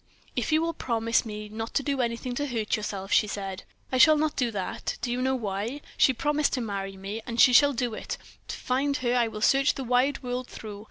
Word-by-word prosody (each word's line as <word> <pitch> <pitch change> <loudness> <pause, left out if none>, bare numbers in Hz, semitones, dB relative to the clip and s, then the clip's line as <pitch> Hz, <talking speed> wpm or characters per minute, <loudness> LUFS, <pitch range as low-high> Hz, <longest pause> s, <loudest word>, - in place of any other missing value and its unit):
"If - - -1
you 310 +1 +3
will 335 0 -1
promise 230 -4 0
me 210 0 -6
not 225 +2 -6
to 280 - +2
do 275 -2 0
anything 235 +1 -2
to 290 +4 -2
hurt 225 -5 -1
yourself," 200 -2 -5
she 210 - +4
said. 195 -2 -5 0.3
"I 255 - +1
shall 310 +3 +8
not 310 0 0
do 245 -3 +1
that. 200 -4 -4
Do 240 - -1
you 250 +1 -1
know 265 +1 +1
why? 220 +4 -3
She - - +5
promised 295 +4 0
to 255 - 0
marry 195 -3 -4
me, 200 +4 -5
and 235 0 -4
she 250 - +7
shall 285 +3 +7
do 245 -2 -1
it. - - -5 0.3
To - - -5
find 275 +3 0
her 240 - +2
I 240 -2 +3
will 215 -1 -7
search 275 +5 +4
the 270 - -4
wide 255 +3 +1
world 250 0 -3
through. 210 -2 -8
240 Hz, 235 wpm, -27 LUFS, 215-270 Hz, 0.3 s, shall